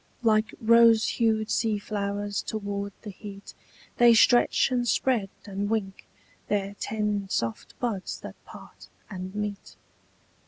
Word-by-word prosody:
Like 215 Hz, -2 st, +2 dB
rose 230 Hz, -1 st, +5 dB
hued 220 Hz, -1 st, 0 dB
sea 220 Hz, -2 st, +1 dB
flowers 205 Hz, 0 st, -3 dB
toward 200 Hz, -1 st, -4 dB
the 210 Hz, -, -7 dB
heat 200 Hz, 0 st, -10 dB, 0.4 s
They 240 Hz, -1 st, +7 dB
stretch 240 Hz, +3 st, +4 dB
and 245 Hz, -1 st, 0 dB
spread 235 Hz, -6 st, +1 dB, 0.2 s
and 200 Hz, 0 st, -3 dB
wink 200 Hz, -4 st, -3 dB, 0.4 s
Their 200 Hz, -1 st, -1 dB
ten 210 Hz, -2 st, -2 dB
soft 115 Hz, -, -3 dB
buds 220 Hz, -6 st, -3 dB
that -, -, -11 dB
part -, -, -14 dB, 0.2 s
and 185 Hz, 0 st, -7 dB
meet. 210 Hz, -1 st, -5 dB
210 Hz, 125 wpm, -26 LUFS, 200-225 Hz, 0.4 s, They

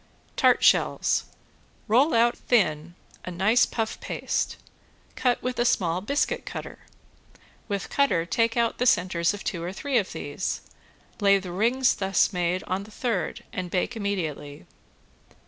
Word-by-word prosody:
~TART -, -, +4 dB
SHELLS~ -, -, +3 dB, 0.6 s
Roll 250 Hz, +6 st, +4 dB
out 235 Hz, +1 st, +4 dB
thin 175 Hz, -7 st, 0 dB, 0.3 s
a -, -, -6 dB
nice 195 Hz, +7 st, +3 dB
puff 225 Hz, -1 st, -3 dB
paste, -, -, -2 dB, 0.6 s
cut 250 Hz, -2 st, 0 dB
with 250 Hz, -1 st, -3 dB
a -, -, +4 dB
small 180 Hz, -7 st, +1 dB
biscuit 290 Hz, -, -1 dB
cutter. -, -, -7 dB, 0.9 s
With 200 Hz, -3 st, -4 dB
cutter 275 Hz, -13 st, +2 dB
take 230 Hz, +5 st, 0 dB
out 235 Hz, -1 st, +1 dB
the 250 Hz, -, +2 dB
centers 180 Hz, -2 st, +2 dB
of 205 Hz, -, -9 dB
two 180 Hz, -6 st, -3 dB
or 175 Hz, +2 st, -4 dB
three 260 Hz, +5 st, 0 dB
of 200 Hz, -, -4 dB
these, -, -, -4 dB, 0.6 s
lay 200 Hz, -1 st, +5 dB
the 185 Hz, -2 st, -6 dB
rings 240 Hz, +8 st, +2 dB
thus 195 Hz, 0 st, +1 dB
made 180 Hz, +1 st, -1 dB
on 185 Hz, +2 st, -2 dB
the -, -, -14 dB
third 220 Hz, -6 st, -3 dB
and 180 Hz, -1 st, -4 dB
bake 185 Hz, +7 st, -1 dB
immediately. 160 Hz, -, -4 dB
200 Hz, 145 wpm, -26 LUFS, 180-235 Hz, 0.9 s, lay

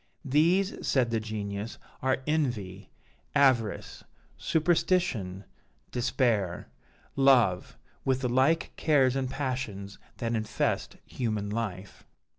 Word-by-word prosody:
'These,' 170 Hz, +8 st, +2 dB
said 125 Hz, -4 st, +2 dB
the 115 Hz, -, +1 dB
Genius, 105 Hz, 0 st, -5 dB, 0.2 s
'are 130 Hz, 0 st, 0 dB
envy, 120 Hz, -12 st, -2 dB, 0.5 s
avarice, 130 Hz, -7 st, +2 dB, 0.3 s
superstition, 160 Hz, -, +1 dB, 0.5 s
despair, 115 Hz, -7 st, 0 dB, 0.5 s
love, 125 Hz, -10 st, +3 dB, 0.3 s
with 130 Hz, -1 st, +1 dB
the 125 Hz, -, 0 dB
like 130 Hz, +7 st, +2 dB
cares 135 Hz, -5 st, +3 dB
and 130 Hz, -2 st, -1 dB
passions 125 Hz, -8 st, -4 dB, 0.2 s
that 115 Hz, 0 st, -2 dB
infest 110 Hz, -1 st, -1 dB
human 105 Hz, -4 st, -3 dB
life.' 100 Hz, -4 st, -5 dB
125 Hz, 95 wpm, -28 LUFS, 105-135 Hz, 0.5 s, love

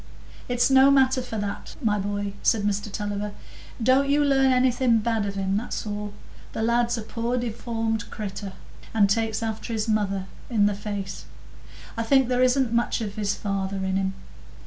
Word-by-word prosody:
"It's 245 Hz, +2 st, +2 dB
no 265 Hz, +1 st, +7 dB
matter 265 Hz, -1 st, +4 dB
for 245 Hz, -3 st, -5 dB
that, 205 Hz, -1 st, -4 dB
my 210 Hz, -6 st, +1 dB
boy," 205 Hz, 0 st, -2 dB
said 215 Hz, -2 st, +2 dB
Mr 205 Hz, 0 st, -1 dB
Tulliver; 205 Hz, 0 st, -3 dB, 0.5 s
"don't 265 Hz, +4 st, +4 dB
you 290 Hz, +1 st, +4 dB
learn 270 Hz, -1 st, +4 dB
anything 250 Hz, -2 st, +3 dB
bad 220 Hz, -2 st, 0 dB
of 200 Hz, -, -4 dB
him, 195 Hz, 0 st, 0 dB
that's 230 Hz, +1 st, -4 dB
all. 205 Hz, 0 st, -4 dB, 0.4 s
The 220 Hz, -, -2 dB
lad's 235 Hz, +1 st, +2 dB
a 225 Hz, -, -4 dB
poor 230 Hz, +3 st, -2 dB
deformed 225 Hz, -2 st, -2 dB
creatur, 200 Hz, -2 st, -6 dB, 0.4 s
and 205 Hz, -2 st, +5 dB
takes 220 Hz, +2 st, 0 dB
after 220 Hz, +1 st, -3 dB
his 220 Hz, 0 st, -1 dB
mother 200 Hz, -3 st, 0 dB, 0.2 s
in 215 Hz, -4 st, +3 dB
the 205 Hz, -, +2 dB
face; 200 Hz, -1 st, -5 dB, 0.7 s
I 230 Hz, -, -2 dB
think 260 Hz, +2 st, +3 dB
there 250 Hz, 0 st, +2 dB
isn't 255 Hz, -1 st, +3 dB
much 235 Hz, +1 st, +1 dB
of 205 Hz, -3 st, -3 dB
his 205 Hz, -1 st, -1 dB
father 195 Hz, -1 st, -2 dB
in 190 Hz, 0 st, -1 dB
him. 190 Hz, 0 st, 0 dB
220 Hz, 175 wpm, -25 LUFS, 205-245 Hz, 0.7 s, no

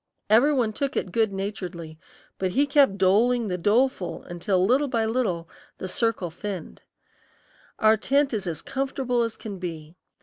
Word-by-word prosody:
Every 245 Hz, +7 st, +6 dB
one 240 Hz, -6 st, +1 dB
took 275 Hz, +5 st, -2 dB
it 185 Hz, -, -2 dB
good 220 Hz, +1 st, +2 dB
naturedly, 180 Hz, -5 st, -6 dB, 0.4 s
but 190 Hz, -, 0 dB
he 280 Hz, +2 st, +3 dB
kept 280 Hz, -8 st, +4 dB
doling 220 Hz, +5 st, +3 dB
the 180 Hz, -, -1 dB
doleful 210 Hz, -1 st, +1 dB
until 180 Hz, +2 st, 0 dB
little 265 Hz, +7 st, +3 dB
by 230 Hz, -4 st, 0 dB
little 220 Hz, -8 st, -1 dB, 0.3 s
the 185 Hz, -, -5 dB
circle 195 Hz, -3 st, -1 dB
thinned. 185 Hz, -1 st, -7 dB, 1.0 s
Our 220 Hz, 0 st, +4 dB
tent 275 Hz, +4 st, +1 dB
is 200 Hz, -4 st, -2 dB
as 165 Hz, -3 st, -4 dB
comfortable 265 Hz, -2 st, -1 dB
as 230 Hz, -1 st, -2 dB
can 205 Hz, -4 st, -7 dB
be. 165 Hz, -2 st, -7 dB
215 Hz, 160 wpm, -25 LUFS, 185-250 Hz, 1.0 s, Every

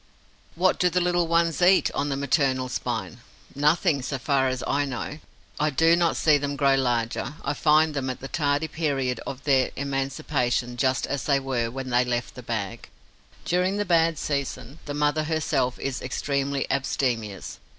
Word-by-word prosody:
What 185 Hz, +2 st, +2 dB
do 180 Hz, -, +4 dB
the 180 Hz, -, +1 dB
little 175 Hz, -1 st, +1 dB
ones 170 Hz, 0 st, +1 dB
eat, 185 Hz, +2 st, +5 dB
on 145 Hz, -, -1 dB
the 140 Hz, -, -1 dB
maternal 135 Hz, -2 st, +1 dB
spine? 125 Hz, -, -4 dB, 0.3 s
Nothing, 150 Hz, +1 st, +2 dB
so 135 Hz, +2 st, -3 dB
far 135 Hz, 0 st, +1 dB
as 130 Hz, 0 st, -2 dB
I 145 Hz, -, +1 dB
know. 140 Hz, +3 st, -5 dB, 0.4 s
I 150 Hz, +1 st, +2 dB
do 165 Hz, +4 st, +4 dB
not 170 Hz, -1 st, +2 dB
see 150 Hz, -2 st, +4 dB
them 145 Hz, 0 st, -3 dB
grow 140 Hz, 0 st, +3 dB
larger. 125 Hz, +1 st, 0 dB
I 140 Hz, -, 0 dB
find 155 Hz, +1 st, +3 dB
them, 135 Hz, -2 st, -2 dB
at 130 Hz, -, -4 dB
the 135 Hz, -, -7 dB
tardy 145 Hz, +1 st, 0 dB
period 140 Hz, -6 st, -1 dB
of 135 Hz, 0 st, -6 dB
their 135 Hz, -3 st, +3 dB
emancipation, 135 Hz, -3 st, -1 dB
just 130 Hz, +1 st, +1 dB
as 140 Hz, -2 st, -3 dB
they 140 Hz, -2 st, +3 dB
were 130 Hz, -4 st, -1 dB
when 130 Hz, +1 st, -6 dB
they 120 Hz, +1 st, +4 dB
left 120 Hz, -1 st, -2 dB
the 125 Hz, -, -9 dB
bag. 115 Hz, -1 st, -4 dB, 0.6 s
During 180 Hz, +3 st, +1 dB
the 205 Hz, -, 0 dB
bad 165 Hz, -2 st, +3 dB
season, 140 Hz, 0 st, -3 dB
the 145 Hz, -, -4 dB
mother 150 Hz, +1 st, +1 dB
herself 150 Hz, -5 st, 0 dB
is 135 Hz, -2 st, -4 dB
extremely 140 Hz, +1 st, -1 dB
abstemious. 120 Hz, -6 st, -2 dB
140 Hz, 175 wpm, -25 LUFS, 130-155 Hz, 0.6 s, eat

